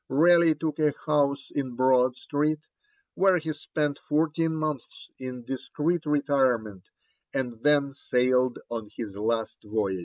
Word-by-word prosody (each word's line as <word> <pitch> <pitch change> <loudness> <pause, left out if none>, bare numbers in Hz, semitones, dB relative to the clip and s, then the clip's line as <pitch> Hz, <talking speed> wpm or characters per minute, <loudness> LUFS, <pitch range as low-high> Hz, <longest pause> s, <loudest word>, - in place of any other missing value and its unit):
Raleigh 165 +3 +5
took 155 -1 -3
a 150 -2 +2
house 140 -2 +1
in 130 -4 -3
Broad 130 0 +3
Street, 150 +3 -1 0.5
where 190 -1 +4
he 160 -1 -3
spent 150 -1 -2
fourteen 160 +1 0
months 155 -5 -4
in 125 -2 -7
discreet 150 +5 -2
retirement, 130 -9 +1 0.5
and 120 -4 -3
then 145 -1 +3
sailed 125 -1 +1
on 115 -3 -5
his 105 -4 -5
last 110 +2 -2
voyage. 105 -3 -1
140 Hz, 130 wpm, -27 LUFS, 125-155 Hz, 0.5 s, Raleigh